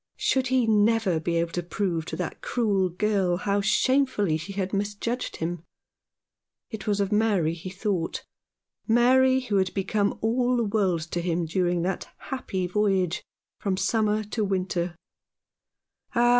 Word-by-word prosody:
Should 260 -1 +1
he 255 -1 +2
never 215 -4 +3
be 170 +2 -1
able 170 0 0
to 175 - -2
prove 175 -2 -2
to - - -5
that - - -5
cruel 200 -6 +1
girl 190 -1 +1
how 200 +2 0
shamefully 210 - +2
she 165 +5 -5
had 190 0 -3
misjudged 205 +5 -2
him? 165 0 -3 1.1
It 220 -3 -7
was 205 -1 +1
of 200 0 0
Mary 205 -7 +2
he 175 +2 -7
thought 185 -3 -2 0.3
— - - -51
Mary, 260 +2 +5
who 215 -5 -1
had 190 -1 +1
become 200 +1 0
all 245 +2 +2
the 235 - +2
world 200 -6 +1
to 170 +2 -3
him 170 -1 0
during 175 +1 0
that 185 +1 -2
happy 195 -9 -3
voyage 190 -2 +1 0.4
from 195 -2 -1
summer 215 +2 +1
to 215 +1 -2
winter 185 -3 -1 0.6
— - - -35
ah! 240 0 +4
200 Hz, 155 wpm, -26 LUFS, 180-220 Hz, 1.1 s, Mary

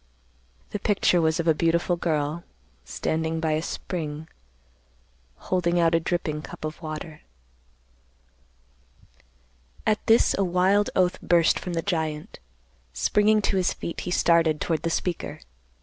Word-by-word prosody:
The 205 - -3
picture 195 -4 +2
was 160 0 +1
of 170 - -1
a 160 - +6
beautiful 170 +2 +1
girl, 155 -1 -1 0.4
standing 160 0 -2
by 160 -1 0
a 155 0 +1
spring, 160 -3 -5 1.1
holding 175 -1 0
out 165 -1 +3
a 165 - +4
dripping 160 -2 -2
cup 155 - -8
of 155 +1 -6
water." 155 0 -7 2.6
At 215 -1 +1
this 225 0 +5
a - - +3
wild 190 +3 +2
oath 180 -1 +1
burst 170 -2 +3
from 180 - -5
the 165 -1 -1
giant. 160 -5 -3 0.5
Springing 210 - +2
to 195 - +1
his 185 - +1
feet, 170 - -6
he - - -5
started 165 -3 +3
toward 160 -2 -1
the 165 - -1
speaker. 175 +1 -3
170 Hz, 135 wpm, -25 LUFS, 160-180 Hz, 2.6 s, a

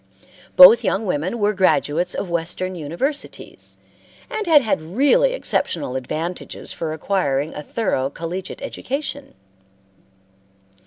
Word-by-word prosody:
Both - - +9
young 205 +3 0
women 180 +5 -2
were 210 -1 +1
graduates 180 -3 +1
of - - -3
Western 175 +2 -2
universities, 175 - -5 0.5
and 430 -3 -3
had 300 -4 +6
had 220 - 0
really 285 - +2
exceptional 130 - -2
advantages 160 +7 -5
for 160 -2 -4
acquiring 155 -3 -1
a 150 - -6
thorough 145 - -1
collegiate 175 - -6
education. 275 +1 -5
185 Hz, 110 wpm, -21 LUFS, -, 0.5 s, Both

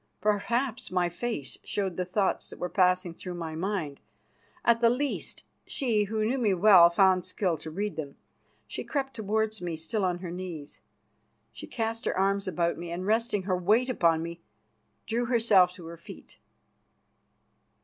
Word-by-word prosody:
Perhaps 225 +4 0
my 180 -1 +1
face 175 - -4
showed 195 -4 -2
the 180 - -2
thoughts 190 +2 0
that - - -10
were 180 - -3
passing 180 -1 +2
through 180 +1 -7
my 165 -2 -5
mind. 165 -4 -3 0.7
At 235 0 +4
the 230 - +6
least, 275 +4 -2 0.2
she 225 -6 0
who 215 +1 -1
knew 260 +4 0
me 210 -6 +2
well 180 -2 +8
found 185 +1 +4
skill 180 -3 -1
to 160 +1 -7
read 195 +1 -3
them. 145 -3 -5 0.5
She - - -6
crept 270 -2 -3
towards 220 -1 -1
me, 175 -2 -3
still 165 +7 -3
on 180 -1 +1
her 175 -1 -7
knees; 175 -5 -7 0.7
she - - -10
cast 225 0 -3
her - - -1
arms 195 +1 +1
about 170 -2 0
me, 170 0 -6
and, 175 +2 -4
resting 220 -1 +1
her 185 -1 0
weight 215 +8 +2
upon 165 -9 +2
me, 170 0 -7 0.6
drew 235 +2 -1
herself 220 -7 +4
to 175 -2 -12
her 165 +1 -8
feet. - - -13
190 Hz, 170 wpm, -28 LUFS, 175-220 Hz, 0.7 s, well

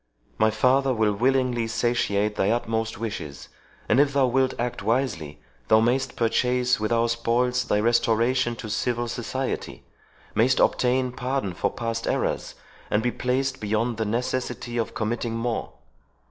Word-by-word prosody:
My 110 - +5
father 130 +4 +2
will 110 -2 +2
willingly 125 +1 +1
satiate 105 -3 0
thy 95 - +1
utmost 115 -1 -1
wishes; 75 -11 -6 0.4
and 115 - +3
if 145 -1 +3
thou 140 -1 +4
wilt 130 +1 +1
act 120 +1 -3
wisely, 100 - -1 0.3
thou 110 - +6
mayst 130 +4 +1
purchase 125 +1 +1
with 110 +1 -2
our 115 0 +3
spoils 120 +2 +1
thy 105 - +1
restoration 120 +2 +2
to 110 - -7
civil 120 +1 -1
society—mayst 125 0 -3
obtain 125 0 +2
pardon 125 -5 -2
for - - 0
past 115 -1 -3
errors, - - -1 0.3
and 105 - +1
be 120 - +1
placed 130 +1 -1
beyond 110 +2 0
the 110 - -1
necessity 120 +2 -2
of 115 - -3
committing 115 +1 -2
more." 115 0 -2
120 Hz, 145 wpm, -25 LUFS, 110-125 Hz, 0.4 s, thou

